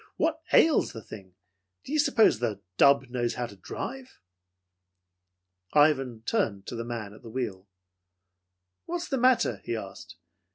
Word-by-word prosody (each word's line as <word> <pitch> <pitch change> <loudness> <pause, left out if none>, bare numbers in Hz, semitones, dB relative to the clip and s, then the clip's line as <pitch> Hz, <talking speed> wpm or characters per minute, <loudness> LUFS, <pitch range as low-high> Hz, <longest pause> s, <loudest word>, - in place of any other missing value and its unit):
"What 320 0 0
ails 320 -1 +4
the 115 - -8
thing? 95 -4 -12 0.5
Do 280 - -7
you 310 - +2
suppose 235 - +4
the 110 -5 -2 0.2
dub 140 -2 +5
knows 120 -1 -1
how 125 - -2
to 105 - -11
drive?" 260 - -7 1.5
Ivan 135 -6 +3
turned 110 - -1
to - - -6
the 115 - -4
man 115 -4 -6
at 105 - -15
the 115 - -11
wheel. 110 -6 -4 1.2
"What's 350 0 -4
the 270 - 0
matter?" 240 - +3
he 120 - -3
asked. 100 -6 -8
120 Hz, 150 wpm, -28 LUFS, -, 1.5 s, dub